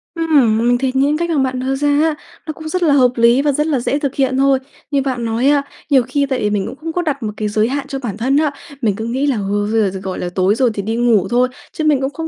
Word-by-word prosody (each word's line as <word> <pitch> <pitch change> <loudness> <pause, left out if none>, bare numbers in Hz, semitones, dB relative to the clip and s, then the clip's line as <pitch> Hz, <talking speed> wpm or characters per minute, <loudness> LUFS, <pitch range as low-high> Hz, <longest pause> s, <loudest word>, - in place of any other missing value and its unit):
Ừm, 295 -10 +3
mình 240 +2 +2
thấy 265 +1 -1
những 280 +3 +2
cách 340 +1 -2
mà 325 - 0
bạn 260 -2 0
đưa 265 +1 -1
ra 290 +2 -1
á, 300 +2 +2 0.3
nó 310 - -3
cũng 315 +1 -9
rất 365 +2 -1
là 305 -4 +4
hợp 255 -3 +4
lý 235 +3 +4
và 290 0 +2
rất 300 +3 0
là 290 -5 +1
dễ 275 +4 -1
thực 280 -2 -3
hiện 265 -1 +1
thôi. 270 0 +3 0.3
Như 280 -1 +2
bạn 255 -3 -2
nói 230 +3 0
á, 285 -1 +3 0.3
nhiều 270 -4 +4
khi 285 +4 -1
tại 260 -2 -1
vì 210 - 0
mình 205 -2 -1
cũng - - -7
không 320 +3 -6
có 355 - 0
đặt 290 -6 -3
một 210 -1 -3
cái 215 - -2
giới 215 +1 +1
hạn 280 +3 -3
cho 270 - -4
bản 225 -7 -5
thân 260 +5 +1
á, 305 -1 +2 0.3
mình 210 -5 +1
cứ 220 - -5
nghĩ 260 +5 -1
là, 275 - +1
ơ, 210 - -2 0.3
bây 220 -4 +2
giờ, 190 - -6
gọi 190 -1 -4
là, 175 - -3
tối 190 +2 +2
rồi 250 +1 +2
thì 200 - -3
đi 220 +3 -3
ngủ 230 -5 +2
thôi, 245 +2 +3 0.3
chứ 315 - -3
mình 295 -3 +2
cũng 270 - 0
không 320 +3 -6
265 Hz, 310 wpm, -17 LUFS, 230-290 Hz, 0.3 s, là